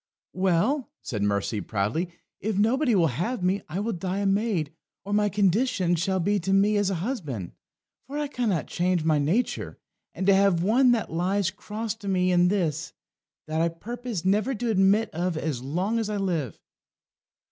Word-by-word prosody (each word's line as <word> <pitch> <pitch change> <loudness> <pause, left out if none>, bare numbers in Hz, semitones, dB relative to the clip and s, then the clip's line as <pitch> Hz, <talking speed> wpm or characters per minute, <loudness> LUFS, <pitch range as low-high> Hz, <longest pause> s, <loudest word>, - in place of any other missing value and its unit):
"Well," 190 - +1
said 110 -6 -4
Mercy 100 +1 0
proudly, 105 - -1 0.3
"if 215 -1 -2
nobody 240 +4 +3
will 175 -4 +4 0.2
have 230 0 -2
me, 190 +2 +1
I 175 +5 -3
will 220 +2 -1
die 185 +1 -3
a 200 - -1
maid, 195 -6 0 0.3
or 205 - -3
my 210 0 +3
conditions 195 -3 +1
shall 190 +2 0
be 200 +4 +1
to 190 +2 -2
me 200 +2 +4
as 205 -2 +2
a 195 - -1
husband. 150 - -4 0.6
For 285 +2 -5
I 300 - 0
cannot 230 - -1
change 175 -1 0
my 155 -2 +3
nature, 175 - -1 0.4
and 190 - -2
to 200 - +6
have 190 -3 +3
one 245 +6 +4
that 225 -8 -2
lies 185 +2 +1
cross 210 +2 -5
to 205 -3 -9
me 185 -1 +2
in 175 0 +4
this, 165 -5 -1 0.5
that 155 +1 -1
I 170 - +2
purpose 225 +2 -6
never 210 +7 +2
to 230 +1 -1
admit 200 +2 +3
of 175 0 -2
as 150 -6 -2
long 180 - -1
as 220 -2 -2
I 210 - -2
live." 170 - -2
190 Hz, 180 wpm, -26 LUFS, 170-215 Hz, 0.6 s, to